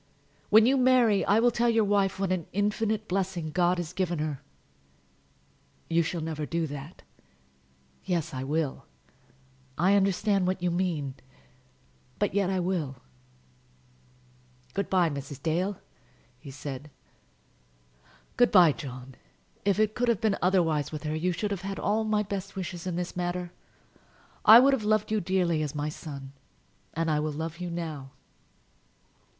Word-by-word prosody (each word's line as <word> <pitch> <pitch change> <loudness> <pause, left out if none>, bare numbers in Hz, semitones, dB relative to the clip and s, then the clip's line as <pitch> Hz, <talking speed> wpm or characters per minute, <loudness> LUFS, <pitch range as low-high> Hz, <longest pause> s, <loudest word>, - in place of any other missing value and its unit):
When 220 +1 +7
you 270 +3 +4
marry 250 -5 +4
I 205 +2 +4
will 240 +1 +4
tell 235 +1 +1
your 225 -1 +3
wife 200 -2 +1
what 195 -2 0
an 180 -4 -1
infinite 210 +2 0
blessing 180 -4 -2
God 180 +2 +2
has 175 -1 -4
given 180 -3 -1
her." 150 -3 -3 1.5
"You 165 +1 +4
shall 165 +1 -3
never 155 -1 -4
do 170 -1 -1
that." 145 +2 -8 1.0
"Yes, 165 -3 -2
I 130 0 -4
will. 145 - -2 0.9
I 185 +5 +3
understand 195 -1 +2
what 185 0 0
you 175 0 0
mean; 170 -6 -1 1.0
but 205 -3 0
yet 200 -2 +1
I 190 -1 0
will." 175 -7 -2 1.8
"Good 200 +1 -2
by, 180 -3 +3
Mrs. 140 -1 -6
Dale," 180 +4 -1 0.6
he 140 - -11
said. 140 +1 -7 1.5
"Good 245 0 +4
by, 175 -5 +7
John. 130 -3 -8 0.5
If 200 -1 +2
it 215 0 +2
could 245 +1 -1
have 235 -4 +2
been 220 -3 +1
otherwise 165 -6 +2
with 155 -1 -6
her, 155 0 -2
you 175 +3 0
should 205 +4 -3
have 195 -3 -3
had 195 0 -5
all 215 +2 0
my 215 -1 +1
best 195 -1 -5
wishes 180 -1 -5
in 180 - -2
the 175 0 -3
matter. 175 0 -3 0.9
I 220 +2 +11
would 275 +2 +5
have 255 -5 0
loved 215 0 +1
you 215 -1 +1
dearly 175 -3 +1
as 150 -1 -3
my 150 +1 -2
son; 140 -3 -8 0.6
and 165 0 0
I 150 - +2
will 155 0 -1
love 160 +2 -5
you 180 -1 -4
now." 160 -5 -5
180 Hz, 155 wpm, -28 LUFS, 155-200 Hz, 1.8 s, I